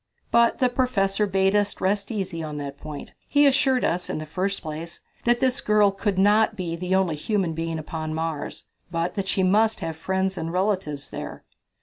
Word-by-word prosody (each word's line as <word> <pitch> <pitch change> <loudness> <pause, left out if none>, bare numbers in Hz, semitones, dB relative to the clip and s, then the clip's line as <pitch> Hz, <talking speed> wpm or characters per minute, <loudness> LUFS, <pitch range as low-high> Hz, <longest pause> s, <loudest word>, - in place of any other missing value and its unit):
But 235 0 +4
the 255 - +3
professor 210 -5 +1
bade 195 +1 +2
us 205 -1 +1
rest 200 +1 0
easy 190 -6 -3
on 150 -2 -5
that 140 -1 -6
point. 150 -2 -8
He 290 0 +4
assured 270 -2 +3
us, 175 +1 -1
in - - -2
the 155 - -5
first 190 +5 -2
place, 160 +2 -6 0.2
that 240 0 +3
this 260 +1 +2
girl 210 -1 +4
could 195 0 -2
not 210 +3 +4
be 175 -4 -3
the 180 +2 -1
only 185 -4 +2
human 185 +1 -1
being 165 0 -3
living - - -3
upon 155 0 -4
Mars, 160 -2 -4 0.2
but 170 0 -1
that 195 -1 -3
she 190 0 +1
must 215 +4 +3
have 165 -2 -3
friends 190 +3 -1
and 165 0 -3
relatives 185 -6 -1
there. - - -7
190 Hz, 200 wpm, -25 LUFS, 165-210 Hz, 0.2 s, But